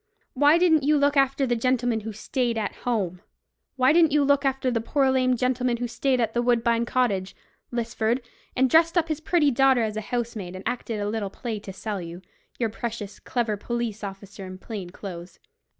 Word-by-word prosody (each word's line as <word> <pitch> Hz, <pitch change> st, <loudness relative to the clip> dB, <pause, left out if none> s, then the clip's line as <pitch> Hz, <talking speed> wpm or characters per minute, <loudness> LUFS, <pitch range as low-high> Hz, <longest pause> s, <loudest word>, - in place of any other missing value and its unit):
Why 290 Hz, +4 st, +5 dB
didn't 335 Hz, -3 st, +4 dB
you 295 Hz, +2 st, +3 dB
look 285 Hz, 0 st, +2 dB
after 275 Hz, 0 st, +3 dB
the 240 Hz, -2 st, +1 dB
gentleman 245 Hz, -1 st, +1 dB
who 220 Hz, +1 st, -6 dB
stayed 235 Hz, +2 st, -2 dB
at 215 Hz, -2 st, -2 dB
home? 190 Hz, -7 st, -1 dB, 0.5 s
Why 260 Hz, +2 st, +4 dB
didn't 330 Hz, -2 st, +5 dB
you 295 Hz, 0 st, +3 dB
look 285 Hz, 0 st, +3 dB
after 265 Hz, -1 st, +1 dB
the 230 Hz, -2 st, 0 dB
poor 270 Hz, +3 st, +2 dB
lame 255 Hz, -1 st, +2 dB
gentleman 250 Hz, 0 st, 0 dB
who 245 Hz, +1 st, -2 dB
stayed 255 Hz, +2 st, 0 dB
at 225 Hz, -2 st, 0 dB
Woodbine 235 Hz, -1 st, +2 dB
Cottage, 200 Hz, -7 st, 0 dB, 0.4 s
Lisford, 235 Hz, 0 st, -1 dB, 0.4 s
and 260 Hz, +1 st, +4 dB
dressed 330 Hz, +5 st, +4 dB
up 330 Hz, -1 st, +2 dB
his 310 Hz, -1 st, -1 dB
pretty 315 Hz, -3 st, +3 dB
daughter 265 Hz, -1 st, +4 dB
as 215 Hz, -1 st, -2 dB
a -, -, -1 dB
housemaid, 225 Hz, -6 st, -4 dB
and 185 Hz, -, -6 dB
acted 235 Hz, -2 st, -3 dB
a 205 Hz, -, -2 dB
little 210 Hz, -2 st, -2 dB
play 225 Hz, +1 st, -5 dB
to 200 Hz, -, -9 dB
sell 200 Hz, 0 st, -4 dB
you, 170 Hz, +2 st, -8 dB, 0.3 s
you 235 Hz, -, +1 dB
precious 220 Hz, -2 st, -6 dB
clever 235 Hz, -4 st, -1 dB
police 235 Hz, -1 st, -3 dB
officer 195 Hz, 0 st, -8 dB
in 185 Hz, 0 st, -8 dB
plain 195 Hz, -2 st, -7 dB
clothes. 175 Hz, -1 st, -9 dB
240 Hz, 195 wpm, -25 LUFS, 215-265 Hz, 0.5 s, Why